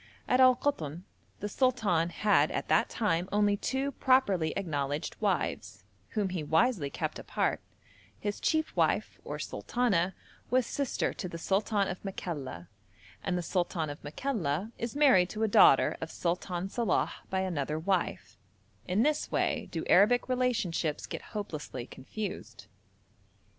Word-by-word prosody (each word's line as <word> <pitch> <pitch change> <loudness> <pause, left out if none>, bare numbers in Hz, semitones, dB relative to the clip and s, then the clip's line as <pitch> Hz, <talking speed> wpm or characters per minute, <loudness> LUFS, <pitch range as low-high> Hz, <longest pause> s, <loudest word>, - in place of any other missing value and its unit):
At 250 - +3
Al 255 -1 +7
Koton 170 - -2 0.4
the 205 - -2
sultan 210 -9 +1
had 210 +4 +3
at - - -3
that - - +3
time 185 -5 0
only 205 0 +3
two 265 +6 -1
properly 205 - +2
acknowledged 145 -5 -2
wives, - - -1 0.3
whom 200 -3 +1
he 180 -3 -3
wisely 160 - +2
kept - - -4
apart; - - -1 0.6
his 205 - -3
chief 315 0 0
wife, - - +1
or - - -5
'sultana,' 190 -7 0 0.3
was 255 0 +3
sister 280 +1 -1
to 180 - -5
the 170 - -6
sultan 200 +3 +1
of 180 - -5
Makalla, 145 - -5 0.6
and 180 -1 0
the 175 - -2
sultan 170 -3 -1
of 145 - -10
Makalla 180 - -2
is 235 +3 -4
married 255 -12 +5
to 215 +3 -3
a - - +3
daughter 170 -8 +6
of 160 - -4
Sultan 180 +2 -2
Salàh 220 -1 0 0.2
by 190 0 0
another 155 -5 -2
wife; 165 - -1 0.5
in 190 +5 +2
this 300 +1 0
way 240 -7 0
do 165 - -4
Arabic 225 +6 +5
relationships 225 - 0
get - - -6 0.2
hopelessly 150 -10 -5
confused. 200 - -7
190 Hz, 140 wpm, -30 LUFS, 165-235 Hz, 0.6 s, Al